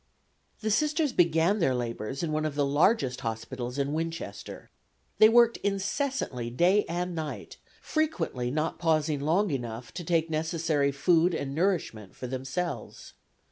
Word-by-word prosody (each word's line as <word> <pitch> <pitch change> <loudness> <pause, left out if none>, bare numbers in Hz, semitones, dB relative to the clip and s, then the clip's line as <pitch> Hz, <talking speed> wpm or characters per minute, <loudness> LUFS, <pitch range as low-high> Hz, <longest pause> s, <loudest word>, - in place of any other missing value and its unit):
The 215 -1 -1
Sisters 300 +4 +1
began 170 +3 +3
their 135 -8 +2
labors 120 +3 -4
in 160 - -1
one 155 0 0
of 155 -2 -2
the 145 -1 +2
largest 145 - +2
hospitals 115 +3 -4
in 140 +1 -1
Winchester. 165 +1 -5 0.5
They 215 - +9
worked 235 0 +5
incessantly 200 - -2
day 180 - +3
and 175 +1 -2
night, 155 -2 -6 0.3
frequently 310 - -1
not 155 +4 -2
pausing 155 -3 +1
long 170 +6 +2
enough 120 -3 -5
to 175 - -5
take 165 -1 +1
necessary 160 -2 0
food 165 +4 +3
and 140 -3 -3
nourishment 155 - -1
for - - -7
themselves. 135 +6 -5
160 Hz, 140 wpm, -28 LUFS, 135-180 Hz, 0.5 s, They